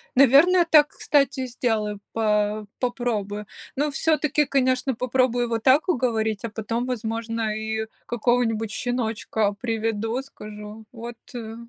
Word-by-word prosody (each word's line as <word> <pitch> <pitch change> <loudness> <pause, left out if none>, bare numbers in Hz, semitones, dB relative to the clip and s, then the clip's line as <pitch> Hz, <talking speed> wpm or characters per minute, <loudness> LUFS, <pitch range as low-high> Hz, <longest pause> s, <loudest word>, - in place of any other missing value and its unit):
Наверное, 295 +7 +6
так, 300 -2 +6
кстати, 275 -3 +1
сделаю, 220 -4 -1
по 210 -1 0
попробую. 215 -5 -2 0.3
Но 295 +2 0
всё-таки, 300 0 +1
конечно, 260 -1 +1
попробую 245 -1 +1
вот 225 -1 -2
так 290 +8 +4
уговорить, 225 - 0
а - - -3
потом, 230 +3 -3
возможно, 225 -2 -2
и 220 0 -3 0.2
какого-нибудь 235 -2 0
щеночка 220 -3 -1
приведу, 225 +1 -2
скажу: 210 -4 -10
"Вот, 235 0 -8 0.2
э, 225 -2 -6
230 Hz, 120 wpm, -24 LUFS, 220-255 Hz, 0.3 s, Наверное